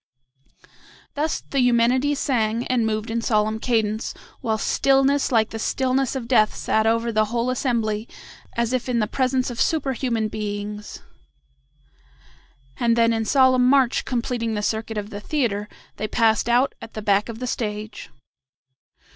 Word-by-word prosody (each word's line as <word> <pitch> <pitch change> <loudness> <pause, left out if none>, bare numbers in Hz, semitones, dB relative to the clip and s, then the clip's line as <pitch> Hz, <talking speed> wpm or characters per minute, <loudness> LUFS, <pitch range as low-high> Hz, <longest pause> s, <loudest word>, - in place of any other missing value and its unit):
Thus 300 +2 -1
the 275 - -3
Eumenides 250 +3 +3
sang, 230 -4 0
and 240 -3 +1
moved 215 +1 -2
in 230 +1 -1
solemn 215 -1 +1
cadence, 220 -2 -1 0.2
while 220 -1 -1
stillness 275 +4 +2
like 225 -2 +2
the 225 - -5
stillness 260 +3 0
of 250 -3 -4
death 215 -4 +3
sat 220 0 +1
over 230 +1 +1
the 215 -1 +2
whole 235 +3 -1
assembly 230 -4 -1 0.5
as 235 +1 0
if 255 0 -1
in 245 - +1
the 215 - +2
presence 255 +2 0
of 235 - -3
superhuman 260 -7 0
beings; 210 0 -5 1.8
and 235 -1 +2
then 230 0 +3
in 225 -1 -1
solemn 255 -1 +4
march 265 -2 +3
completing 235 -2 -2
the 210 - -2
circuit 220 +1 -2
of 210 +1 -4
the 205 0 -6
theatre, 210 -7 -1 0.3
they 215 - -2
passed 225 +1 +2
out 250 +3 +3
at 225 - -11
the 215 - -5
back 205 +2 +2
of 225 - -6
the 250 - -4
stage. 215 -3 -4
230 Hz, 155 wpm, -23 LUFS, 215-255 Hz, 1.8 s, solemn